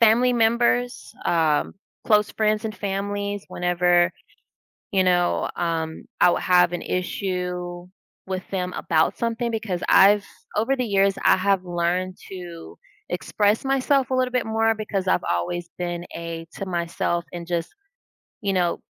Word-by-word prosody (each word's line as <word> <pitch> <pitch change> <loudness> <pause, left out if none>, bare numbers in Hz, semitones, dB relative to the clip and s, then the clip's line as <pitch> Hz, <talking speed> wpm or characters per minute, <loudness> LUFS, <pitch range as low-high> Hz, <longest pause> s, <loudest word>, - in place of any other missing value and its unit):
family 235 +2 +5
members, 240 +3 +1
um, 160 -2 +2 0.3
close 210 -2 +3
friends 215 0 0
and 215 - -3
families 200 +1 -3
whenever, 175 0 +2 0.8
you 190 -2 +3
know, 175 -1 +2
um, 165 -2 -2 0.2
I 180 - +7
will - - +2
have 180 -1 +4
an 175 - -3
issue 180 -1 -3 0.4
with 190 0 -3
them 180 -2 -2
about 160 0 +1
something 235 +1 -1
because 210 -5 -3
I've 205 +1 +6 0.3
over 230 +6 +2
the 255 -2 -1
years, 195 -2 +2
I - - +6
have 190 0 +1
learned 180 +1 -1
to 175 -3 -9 0.3
express 210 +4 0
myself 270 0 +2
a - - +2
little 255 -1 +1
bit 250 - 0
more, 225 0 +2
because 210 -3 -3
I've 90 - +2
always 170 - -1
been 175 -1 -3
a 165 -1 -5
to 195 - -5
myself 170 -1 -1
and 170 -1 -6
just 170 -1 -2 0.7
you 200 -1 0
know, 175 -2 +1
185 Hz, 145 wpm, -24 LUFS, 175-215 Hz, 0.8 s, I